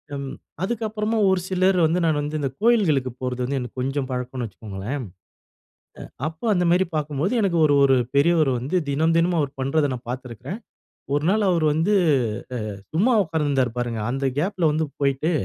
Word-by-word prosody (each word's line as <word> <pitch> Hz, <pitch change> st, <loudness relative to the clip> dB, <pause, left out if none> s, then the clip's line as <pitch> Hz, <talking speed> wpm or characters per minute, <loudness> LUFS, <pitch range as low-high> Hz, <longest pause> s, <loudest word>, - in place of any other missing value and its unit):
ம் 140 Hz, -1 st, -5 dB, 0.3 s
அதுக்கு 230 Hz, +3 st, -2 dB
அப்புறமா 215 Hz, +1 st, -2 dB
ஒரு 190 Hz, -1 st, +2 dB
சிலர் 185 Hz, 0 st, +2 dB
வந்து 165 Hz, +3 st, +1 dB
நான் 155 Hz, -2 st, +2 dB
வந்து 150 Hz, +1 st, -3 dB
இந்த 140 Hz, -2 st, -1 dB
கோவில்களுக்கு 180 Hz, -, +3 dB
போறது 125 Hz, -1 st, -2 dB
வந்து 140 Hz, +2 st, -1 dB
எனக்கு 125 Hz, 0 st, -7 dB
கொஞ்சம் 135 Hz, +1 st, -2 dB
பழக்கம்ன்னு 125 Hz, 0 st, -3 dB
வச்சுக்கோங்களேன். 110 Hz, +6 st, -6 dB, 1.0 s
அ -, -, -8 dB, 0.2 s
அப்ப 160 Hz, 0 st, -13 dB
அந்த 180 Hz, -1 st, +1 dB
மாரி 180 Hz, +1 st, +3 dB
பார்க்கும்போது, 150 Hz, -, -1 dB
எனக்கு 180 Hz, -4 st, +1 dB
ஒரு 145 Hz, -, +3 dB
ஒரு 135 Hz, -1 st, +5 dB, 0.2 s
பெரியவரு 155 Hz, -1 st, +4 dB
வந்து 135 Hz, +10 st, -1 dB
தினம் 160 Hz, +4 st, +2 dB
தினமும் 170 Hz, +1 st, +2 dB
அவர் 140 Hz, -2 st, -2 dB
பண்றத 140 Hz, +2 st, +1 dB
நான் 125 Hz, -1 st, -9 dB
பார்த்திருக்கேன். 125 Hz, -, -6 dB, 0.6 s
ஒரு 145 Hz, +1 st, 0 dB
நாள் 210 Hz, 0 st, +2 dB
அவர் 165 Hz, -3 st, +2 dB
வந்து 165 Hz, +7 st, +1 dB, 0.8 s
அ -, -, -8 dB, 0.2 s
சும்மா 230 Hz, +9 st, +3 dB
உட்கார்ந்திருந்தாரு 145 Hz, -6 st, 0 dB
பாருங்க. 120 Hz, -2 st, -2 dB
அந்த 135 Hz, +1 st, -2 dB
கேப்புல 175 Hz, -1 st, +1 dB
வந்து 155 Hz, 0 st, 0 dB
போயிட்டு, 140 Hz, +4 st, +1 dB
150 Hz, 170 wpm, -23 LUFS, 130-175 Hz, 1.0 s, ஒரு